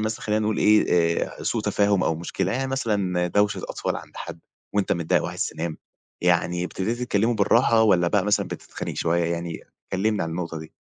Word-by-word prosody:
مثلًا 110 Hz, 0 st, -2 dB
خلّينا 105 Hz, 0 st, 0 dB
نقول 105 Hz, 0 st, 0 dB
إيه، 105 Hz, 0 st, +5 dB, 0.4 s
آآ -, -, -1 dB
ع -, -, -6 dB
سوء -, -, -1 dB
تفاهم 100 Hz, -1 st, +2 dB
أو 80 Hz, -, +1 dB
مشكلة، 90 Hz, +3 st, -2 dB
يعني 135 Hz, +3 st, -1 dB
مثلًا 100 Hz, -9 st, 0 dB
دوشة 105 Hz, +3 st, +1 dB
أطفال -, -, -2 dB
عند -, -, -11 dB
حد 85 Hz, -1 st, -7 dB, 0.4 s
وأنت 100 Hz, -1 st, +1 dB
متضايق 85 Hz, -2 st, +1 dB
وعايز -, -, -2 dB
تنام، 80 Hz, 0 st, -4 dB, 0.4 s
يعني 90 Hz, 0 st, +1 dB
ابتديت 105 Hz, +6 st, -2 dB
تكلّمه 115 Hz, 0 st, +1 dB
بالراحة 115 Hz, +2 st, +4 dB
والّا 90 Hz, -5 st, +4 dB
بقى 100 Hz, +1 st, +2 dB
مثلًا 105 Hz, -, +2 dB
بتتخانق -, -, -6 dB
شوية، 85 Hz, +1 st, +1 dB
يعني 85 Hz, -1 st, -3 dB, 0.3 s
كلّمني 105 Hz, +2 st, +1 dB
عن 80 Hz, -, -3 dB
النقطة 85 Hz, -1 st, -4 dB
دي؟ 80 Hz, 0 st, -11 dB
95 Hz, 190 wpm, -24 LUFS, 85-105 Hz, 0.4 s, إيه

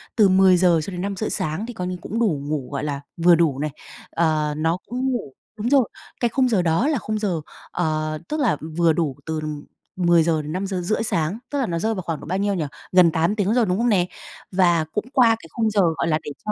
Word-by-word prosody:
từ 210 Hz, -4 st, +5 dB
10:00 185 Hz, -3 st, +5 dB
cho 195 Hz, -, -6 dB
đến 180 Hz, -, -5 dB
5:30 200 Hz, +2 st, -2 dB
sáng 185 Hz, +1 st, -2 dB
thì 245 Hz, -, -7 dB
coi 180 Hz, -4 st, -4 dB
như 180 Hz, 0 st, -3 dB
cũng 225 Hz, -, -4 dB
đủ 175 Hz, -12 st, +1 dB
ngủ, 145 Hz, -5 st, -3 dB
gọi 140 Hz, -, -3 dB
là, 145 Hz, -2 st, -3 dB, 0.2 s
vừa 170 Hz, 0 st, +6 dB
đủ 155 Hz, -5 st, +1 dB
này, 150 Hz, 0 st, -2 dB, 0.4 s
ờ, 155 Hz, -2 st, +1 dB
nó 165 Hz, +2 st, +1 dB
cũng 255 Hz, +2 st, -1 dB
ngủ 215 Hz, -, -4 dB, 0.2 s
đúng 220 Hz, +3 st, -1 dB
rồi, 270 Hz, -4 st, +4 dB, 0.3 s
cái 240 Hz, -, +2 dB
khung 255 Hz, +2 st, +2 dB
giờ 200 Hz, -6 st, +2 dB
đó 170 Hz, -, +2 dB
là 305 Hz, -4 st, +1 dB
khung 215 Hz, -1 st, -3 dB
giờ, 185 Hz, -7 st, -1 dB, 0.3 s
ờ, 155 Hz, -2 st, -1 dB
tức 305 Hz, -, -2 dB
là, 235 Hz, -, +2 dB
ừm, 160 Hz, 0 st, -8 dB
vừa 170 Hz, -1 st, +4 dB
đủ 155 Hz, -5 st, -1 dB
từ 160 Hz, -1 st, -2 dB, 0.6 s
10:00-5:30 175 Hz, +3 st, +1 dB
sáng, 170 Hz, 0 st, -1 dB
tức 285 Hz, -, -2 dB
là 265 Hz, -, +1 dB
nó 170 Hz, -4 st, -2 dB
rơi 220 Hz, +4 st, 0 dB
vào 185 Hz, -, -3 dB
khoảng 165 Hz, -3 st, -4 dB
độ -, -, -10 dB
bao 185 Hz, +4 st, -1 dB
nhiêu 200 Hz, 0 st, 0 dB
nhỉ? 165 Hz, -5 st, -1 dB, 0.3 s
Gần 180 Hz, -3 st, +6 dB
8 165 Hz, +6 st, +1 dB
tiếng 205 Hz, +1 st, +1 dB
rồi, 245 Hz, -2 st, +3 dB
đúng 180 Hz, -1 st, 0 dB
không 240 Hz, +2 st, +2 dB
nè? 185 Hz, -5 st, +3 dB, 0.5 s
Và 175 Hz, -4 st, +3 dB
cũng 210 Hz, -, -2 dB
qua 250 Hz, -4 st, +6 dB
cái 165 Hz, -, -13 dB
khung 225 Hz, -2 st, 0 dB
giờ, 205 Hz, -2 st, +2 dB, 0.2 s
gọi -, -, 0 dB
là, 155 Hz, -1 st, +1 dB
để 145 Hz, -, -6 dB
cho 210 Hz, -, -1 dB
180 Hz, 240 wpm, -22 LUFS, 160-215 Hz, 0.6 s, vừa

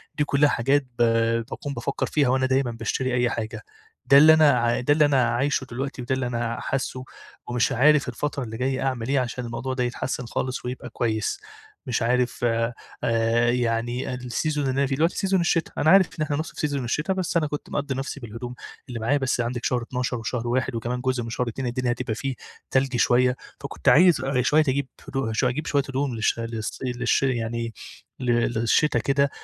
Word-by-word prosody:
دي 150 Hz, -, +1 dB
كلها 145 Hz, 0 st, +3 dB
حاجات، 135 Hz, +3 st, +1 dB
ب -, -, +5 dB, 0.5 s
باكون 145 Hz, -5 st, -5 dB
بافكر 120 Hz, +3 st, -2 dB
فيها 145 Hz, -4 st, +2 dB
وأنا 130 Hz, +1 st, +2 dB
دايمًا 130 Hz, -2 st, +1 dB
باشتري 125 Hz, +3 st, -2 dB
أي 125 Hz, -1 st, +2 dB
حاجة 115 Hz, -1 st, -4 dB, 0.4 s
ده 140 Hz, -, +7 dB
اللي 155 Hz, +2 st, +9 dB
أنا 155 Hz, -2 st, +6 dB
ع 120 Hz, 0 st, +1 dB
ده 145 Hz, +4 st, +3 dB
اللي 150 Hz, -1 st, +4 dB
أنا 130 Hz, -4 st, +3 dB
عايشه 135 Hz, +3 st, 0 dB
دلوقتي 130 Hz, +2 st, -5 dB
وده 125 Hz, +2 st, -1 dB
اللي 130 Hz, -2 st, -2 dB
أنا 120 Hz, -1 st, -2 dB
حاسه 130 Hz, -1 st, -3 dB, 0.4 s
ومش 120 Hz, +2 st, +1 dB
عارف 140 Hz, +1 st, +4 dB
الفترة 140 Hz, +2 st, -3 dB
اللي 110 Hz, -1 st, -6 dB
جاية 130 Hz, +2 st, -1 dB
أعمل 125 Hz, -4 st, -2 dB
إيه 140 Hz, -, +3 dB
عشان 125 Hz, -1 st, -3 dB
الموضوع 120 Hz, +3 st, -4 dB
ده 125 Hz, -1 st, -1 dB
يتحسن 125 Hz, +1 st, -3 dB
خالص، 125 Hz, +2 st, -3 dB
ويبقى 125 Hz, 0 st, -5 dB
كويس 110 Hz, -, -1 dB, 0.5 s
مش 125 Hz, -, 0 dB
عارف 125 Hz, +1 st, 0 dB
آآ، 115 Hz, 0 st, +1 dB, 0.8 s
يعني 120 Hz, +1 st, -1 dB
السيزون 125 Hz, +5 st, -2 dB
اللي 130 Hz, +1 st, 0 dB
أنا 140 Hz, -, +2 dB
فيه 135 Hz, -, -1 dB
دلوقتي 165 Hz, +4 st, +2 dB
في -, -, -2 dB
سيزون 195 Hz, -2 st, +2 dB
الشتا، 170 Hz, -1 st, +1 dB
أنا 155 Hz, -, +3 dB
عارف 195 Hz, -2 st, +7 dB
إن 155 Hz, -, +2 dB
إحنا 145 Hz, -1 st, -2 dB
نص 155 Hz, -, -4 dB
في -, -, -11 dB
سيزون 145 Hz, -3 st, -1 dB
الشتا 150 Hz, +10 st, -1 dB
بس 185 Hz, -2 st, -1 dB
أنا 155 Hz, -, +1 dB
كنت 150 Hz, 0 st, -6 dB
مقضي 140 Hz, -2 st, -2 dB
نفسي 135 Hz, +2 st, -4 dB
بالهدوم 120 Hz, +1 st, -7 dB, 0.3 s
اللي 120 Hz, -2 st, -5 dB
معايا 130 Hz, +6 st, +1 dB
بس 135 Hz, -2 st, 0 dB
عندِك 120 Hz, 0 st, -3 dB
شهر 125 Hz, -1 st, +1 dB
12 125 Hz, 0 st, -3 dB
وشهر 115 Hz, +2 st, -3 dB
1 125 Hz, +1 st, 0 dB
وكمان 120 Hz, +2 st, -3 dB
جزء 130 Hz, -2 st, 0 dB
من 115 Hz, -, -6 dB
شهر 125 Hz, +1 st, -2 dB
2 125 Hz, +2 st, -4 dB
الدنيا 125 Hz, 0 st, -1 dB
هتبقى 120 Hz, -2 st, -3 dB
فيه 135 Hz, +2 st, -3 dB, 0.4 s
تلج 130 Hz, -1 st, +1 dB
شوية، 125 Hz, +1 st, +3 dB, 0.3 s
فكنت -, -, 0 dB
عايز 175 Hz, -4 st, +6 dB, 0.2 s
شوية 150 Hz, +5 st, +4 dB
أجيب 140 Hz, +1 st, 0 dB, 0.2 s
هدو 135 Hz, -4 st, -2 dB
أجيب 130 Hz, +5 st, 0 dB
شوية 140 Hz, -2 st, +2 dB
هدوم 135 Hz, -2 st, -1 dB
للش 110 Hz, +1 st, 0 dB
للص 115 Hz, -1 st, -4 dB
للش 125 Hz, 0 st, 0 dB
يعني 115 Hz, -2 st, -1 dB, 0.5 s
ل 125 Hz, -2 st, 0 dB
للشتا 120 Hz, +3 st, +2 dB
كده، 140 Hz, +4 st, +2 dB
125 Hz, 200 wpm, -24 LUFS, 120-140 Hz, 0.8 s, اللي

